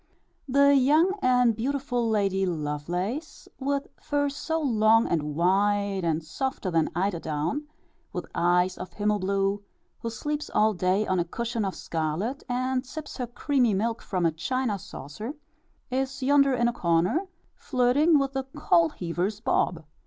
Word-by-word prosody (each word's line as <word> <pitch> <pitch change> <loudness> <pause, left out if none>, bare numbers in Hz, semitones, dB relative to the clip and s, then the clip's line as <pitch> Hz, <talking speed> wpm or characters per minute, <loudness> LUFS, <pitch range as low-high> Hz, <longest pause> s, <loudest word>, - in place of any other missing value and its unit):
The 280 +2 +5
young 305 +8 +4
and 250 -2 +4
beautiful 245 -1 -1
Lady 195 -3 +1
Lovelace, 175 - -3
with 280 +1 -1 0.2
fur 285 -1 0
so 320 +3 -2
long 225 -5 +4
and 150 -3 -1
white, 200 +3 +2
and 165 -1 0
softer 195 - -3
than 165 -2 +2
eider 180 0 0
down, 160 - -2 0.4
with - - -4
eyes 180 +1 +2
of 180 -1 -7
himmel 210 0 0
blue, 195 +1 0 0.4
who 230 - -3
sleeps 295 +6 -4
all 215 +1 +4
day 185 +3 +1
on 185 -2 0
a - - +2
cushion 230 +5 -3
of 195 -2 -2
scarlet, 165 - -2
and 255 +1 0
sips 300 +3 -8
her 250 -3 -3
creamy 245 -2 +1
milk 225 +4 -1
from 185 -4 -1
a 165 - +3
china 215 +6 -2
saucer, 210 - -7 0.6
is 265 +1 -2
yonder 275 0 +4
in 240 -1 +2
a 240 - 0
corner, 180 - +1 0.3
flirting 275 +5 +3
with 275 -1 0
the 270 -1 -2
coal 170 -1 +4
heaver's 180 +5 -3
Bob. 180 -8 0
220 Hz, 150 wpm, -27 LUFS, 180-265 Hz, 0.6 s, The